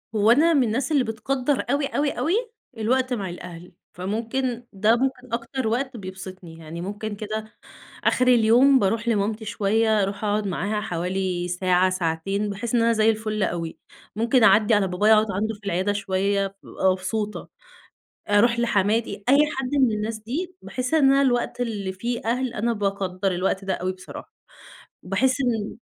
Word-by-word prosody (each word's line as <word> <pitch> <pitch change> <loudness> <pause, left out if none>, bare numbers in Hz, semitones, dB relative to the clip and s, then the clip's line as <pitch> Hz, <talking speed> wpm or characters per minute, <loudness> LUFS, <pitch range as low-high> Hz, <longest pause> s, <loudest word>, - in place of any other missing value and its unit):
هو 215 +2 +4
أنا 325 +6 +5
من 275 -4 +4
الناس 245 +7 -1
اللي 280 -4 +3
بتقدّر 250 +4 -1
أوي، 280 +1 +1
أوي، 290 -1 0
أوي 335 - -1 0.4
الوقت 255 +3 +1
مع 195 -6 -3
الأهل، 175 0 -9 0.2
فممكن 230 +6 -3
ده 215 +4 +3
ممكن 255 -1 -2
أكتر 235 +1 -2
وقت 250 +2 -1
بيبسِطني، 185 -3 -9
يعني 165 +2 -8
ممكن 205 +2 -5
كده 215 +1 -5 0.5
آخِر 255 - +2
اليوم 250 +3 +5
بارُوح 225 +3 0
لمامتي 215 0 0
شوية، 215 0 +1
أرُوح 200 +2 -4
أقعُد 210 0 0
معاها 205 +4 -2
حوالي 180 -1 -2
ساعة، 180 +1 +2
ساعتين، 185 +3 -1
باحس 215 +4 -3
إن 230 - +3
أنا 230 0 +3
زي 220 0 +3
الفل 215 -2 -1
أوي، 170 -2 -3 0.4
ممكن 235 +2 +2
أعدّي 220 0 +5
على 200 -2 +3
بابايا 205 +5 +3
أقعُد 215 -1 +3
عَنده 215 +4 -1
في 205 0 -15
العيادة 190 +2 0
شوية، 195 0 -1
بابقى 190 - +1
مبسوطة، 205 +3 -3 0.8
أرُوح 235 +3 +4
لحماتي، 220 -1 +1
أي 275 - +6 0.2
حد 260 -1 -2
من 260 -5 +3
الناس 215 +1 -3
دي 320 +12 -5
باحس 255 +4 -3
إن 305 -3 +4
أنا 275 0 +4
الوقت 245 -1 0
اللي 205 -5 -2
فيه 235 +5 -3
أهل، 250 +2 -1
أنا 235 +2 0
باقدّر 195 -2 -1
الوقت 190 +2 -1
ده 190 - -1
أوي 185 +1 -2
بصراحة، 185 0 -11 0.7
وباحس 260 0 +1
إن 225 -5 -1
215 Hz, 165 wpm, -24 LUFS, 195-240 Hz, 0.8 s, أي